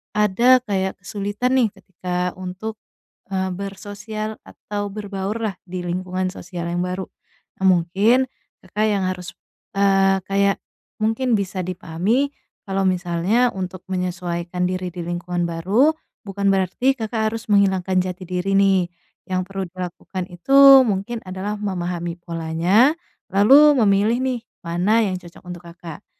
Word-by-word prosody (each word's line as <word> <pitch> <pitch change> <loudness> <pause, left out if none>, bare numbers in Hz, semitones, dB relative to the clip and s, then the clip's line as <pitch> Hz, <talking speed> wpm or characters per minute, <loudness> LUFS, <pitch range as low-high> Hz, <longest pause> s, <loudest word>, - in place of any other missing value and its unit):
ada 210 +5 +5
kayak 190 -2 -1
kesulitan 205 +6 -2
nih 235 - +4
ketika 180 -2 -3
untuk, 185 +4 -5 0.6
eee, 190 0 0
bersosial 205 +3 -6
atau 205 -1 -5
berbaurlah 205 +1 -3
di 180 0 -5
lingkungan 185 +1 -2
sosial 175 -1 -6
yang 175 +1 -1
baru. 185 +1 -3 0.6
Eee, - - +4
mungkin 195 +8 +3 0.4
Kakak 210 +4 -1
yang 195 -3 0
harus, 180 -1 -6 0.5
eee, 195 -1 +4
kayak 200 0 +2 0.4
mungkin 225 +3 +1
bisa 190 -3 -2
dipahami 190 +9 0 0.3
kalau 195 -2 -1
misalnya 185 +7 +1
untuk 185 0 -5
menyesuaikan 180 -1 -2
diri 185 0 -3
di 175 - -5
lingkungan 175 +1 -3
baru, 195 - +3 0.3
bukan 200 0 -3
berarti 195 +7 +2
Kakak 220 -2 -2
harus 225 -1 -7
menghilangkan 190 -2 +3
jati 185 0 -2
diri 185 +2 -2
nih. 195 -2 +4 0.4
Yang 185 -1 -1
perlu 195 0 -3
dilakukan 180 +1 -6
itu 270 +7 +7
mungkin 205 +3 -2
adalah 190 +3 -4
memahami 175 -4 -3
polanya, 170 - +2 0.4
lalu 280 +9 +7
memilih 210 +4 +3
nih 255 -2 -1 0.2
mana 180 +7 +2
yang 185 -4 -1
cocok 175 -1 -15
untuk 180 -1 -9
Kakak. 170 +2 -10
190 Hz, 130 wpm, -21 LUFS, 180-210 Hz, 0.6 s, itu